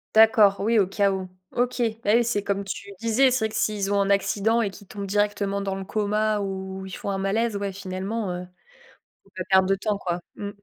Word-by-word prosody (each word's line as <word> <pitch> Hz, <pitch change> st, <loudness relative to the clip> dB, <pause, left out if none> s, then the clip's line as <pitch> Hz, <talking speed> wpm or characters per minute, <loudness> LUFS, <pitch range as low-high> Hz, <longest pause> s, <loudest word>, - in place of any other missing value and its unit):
D'accord, 220 Hz, -2 st, +6 dB
oui, 225 Hz, +2 st, +3 dB
au 190 Hz, -, +3 dB
cas 200 Hz, 0 st, +2 dB
où. 190 Hz, -1 st, -3 dB, 0.2 s
OK, 245 Hz, 0 st, -1 dB, 0.2 s
bah, 205 Hz, -, +2 dB
oui, 240 Hz, -, +4 dB
c'est 230 Hz, -3 st, 0 dB
comme 200 Hz, 0 st, -2 dB
tu 200 Hz, +1 st, -6 dB
disais, 245 Hz, +3 st, +4 dB
c'est 245 Hz, -3 st, +1 dB
vrai -, -, -1 dB
que 215 Hz, -, -9 dB
s'ils 210 Hz, -2 st, 0 dB
ont 200 Hz, -, +2 dB
un 200 Hz, 0 st, +1 dB
accident 210 Hz, +3 st, +2 dB
et 210 Hz, -, 0 dB
qu'ils 200 Hz, 0 st, -14 dB
tombent 200 Hz, -1 st, -6 dB
directement 205 Hz, 0 st, 0 dB
dans 195 Hz, -1 st, -2 dB
le 195 Hz, -, -5 dB
coma 210 Hz, +1 st, 0 dB
ou 190 Hz, -1 st, -5 dB
ils 190 Hz, -, -9 dB
font -, -, -5 dB
un 195 Hz, -, -1 dB
malaise, 205 Hz, +3 st, 0 dB
ouais, 200 Hz, -1 st, -3 dB
finalement, 190 Hz, +2 st, -4 dB
heu, 180 Hz, 0 st, -5 dB, 0.8 s
faut 195 Hz, -, -25 dB
pas 185 Hz, -, -2 dB
perdre 190 Hz, 0 st, +5 dB
de 195 Hz, -, +3 dB
temps 205 Hz, +1 st, -2 dB
quoi. 175 Hz, -2 st, -2 dB, 0.2 s
Mmh. 205 Hz, -, -5 dB
200 Hz, 230 wpm, -25 LUFS, 195-215 Hz, 0.8 s, D'accord